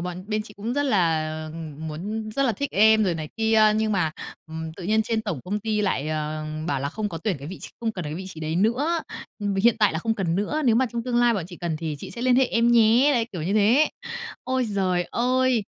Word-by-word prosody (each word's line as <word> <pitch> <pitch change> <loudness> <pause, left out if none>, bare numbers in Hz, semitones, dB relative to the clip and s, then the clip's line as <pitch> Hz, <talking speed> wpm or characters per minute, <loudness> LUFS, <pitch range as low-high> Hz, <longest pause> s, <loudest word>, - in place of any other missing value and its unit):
"Bọn 180 +1 -5
bên 215 0 0
chị 210 -1 -13
cũng 215 +4 -3
rất 285 - +1
là, 165 - +1
ừm, 160 -1 -7
muốn 210 +8 -4
rất 275 +6 0
là 255 - +2
thích 280 +7 -3
em 220 +1 +5
rồi 180 -4 +1
này 155 -2 -5
kia, 220 -1 +4
nhưng 220 -1 +1
mà, 170 -5 +1 0.4
ừm, 160 0 -6
tự 185 - -8
nhiên 220 +4 +2
trên 220 0 -1
tổng 175 - -3
công 205 +3 -2
ty 215 -1 -1
lại, 155 -7 0
ờ, 155 0 -3 0.2
bảo 140 -5 -1
là 140 - -1
không 210 +7 -3
có 165 - -6
tuyển 200 -3 -1
cái 140 +2 -8
vị 190 - -7
tr - - -5
không 225 -1 -1
cần 180 -4 -5
cái 150 0 -4
vị 185 +3 -6
trí 165 -4 -9
đấy 155 +1 -2
nữa, 250 - +2 0.4
ừm, 205 -2 -1
vì 195 - +1
hiện 235 -1 +5
tại 210 -3 +4
là 160 - -1
không 225 +6 -1
cần 180 -6 -1
nữa. 295 +10 -1
Nếu 235 -4 +4
mà 260 +1 +3
trong 235 -1 -2
tương 245 -1 -1
lai 240 -1 +4
bọn 190 -6 -2
chị 175 - -10
cần 170 -3 -2
thì 155 -2 -4
chị - - -8
sẽ 235 - -5
liên 255 -1 +4
hệ 265 - +5
em 235 0 +2
nhé." 235 +5 +5
Đấy, 235 -2 +1
kiểu 175 -5 -4
như 190 +6 -1
thế. 235 +9 +4 0.6
Ôi 260 0 0
giời 185 -5 0
ơi! 255 -2 +2
210 Hz, 270 wpm, -24 LUFS, 165-230 Hz, 0.6 s, em